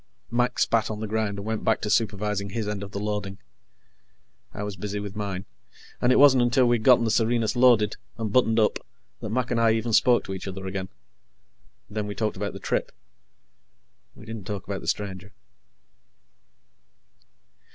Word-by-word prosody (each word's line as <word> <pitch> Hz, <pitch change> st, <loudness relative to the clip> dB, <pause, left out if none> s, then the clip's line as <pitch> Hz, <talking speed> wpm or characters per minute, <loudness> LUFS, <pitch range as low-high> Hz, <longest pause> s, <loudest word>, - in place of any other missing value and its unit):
Mac 125 Hz, +1 st, +1 dB
spat 115 Hz, -2 st, +2 dB
on 105 Hz, -1 st, -4 dB
the 110 Hz, -, -3 dB
ground 110 Hz, -1 st, -1 dB
and 100 Hz, -, -6 dB
went 110 Hz, 0 st, -3 dB
back 110 Hz, -, +2 dB
to -, -, -3 dB
supervising 105 Hz, -2 st, 0 dB
his 110 Hz, +1 st, -3 dB
end 105 Hz, -1 st, -3 dB
of 100 Hz, -, -6 dB
the 100 Hz, -, -6 dB
loading. 105 Hz, -2 st, -3 dB, 1.1 s
I 105 Hz, -, -6 dB
was 105 Hz, -1 st, -4 dB
busy 105 Hz, +2 st, -4 dB
with 100 Hz, 0 st, -7 dB
mine, 100 Hz, -2 st, -4 dB, 0.6 s
and 120 Hz, -, +3 dB
it -, -, +5 dB
wasn't 135 Hz, -3 st, +7 dB
until 120 Hz, +2 st, +3 dB
we'd 120 Hz, -2 st, +2 dB
gotten 120 Hz, 0 st, +5 dB
the 110 Hz, -, +1 dB
Serenus 115 Hz, 0 st, +1 dB
loaded 120 Hz, -4 st, +4 dB, 0.2 s
and 110 Hz, -2 st, -3 dB
buttoned 115 Hz, -3 st, +3 dB
up 105 Hz, -, +2 dB, 0.4 s
that 110 Hz, -, -6 dB
Mac 125 Hz, +2 st, -1 dB
and 115 Hz, -1 st, +1 dB
I 115 Hz, -1 st, +4 dB
even 115 Hz, +1 st, -1 dB
spoke 120 Hz, +3 st, +4 dB
to 95 Hz, -, -6 dB
each 95 Hz, -, -6 dB
other 95 Hz, 0 st, -6 dB
again. 95 Hz, 0 st, -4 dB, 1.0 s
Then 105 Hz, 0 st, -4 dB
we 105 Hz, -, -5 dB
talked 110 Hz, -2 st, -1 dB
about 100 Hz, +1 st, -4 dB
the -, -, -8 dB
trip. -, -, -1 dB, 1.2 s
We -, -, -13 dB
didn't 110 Hz, -3 st, -7 dB
talk 100 Hz, -3 st, -5 dB
about 100 Hz, -1 st, -4 dB
the -, -, -10 dB
stranger. 100 Hz, -1 st, -3 dB
105 Hz, 185 wpm, -25 LUFS, 100-115 Hz, 1.2 s, wasn't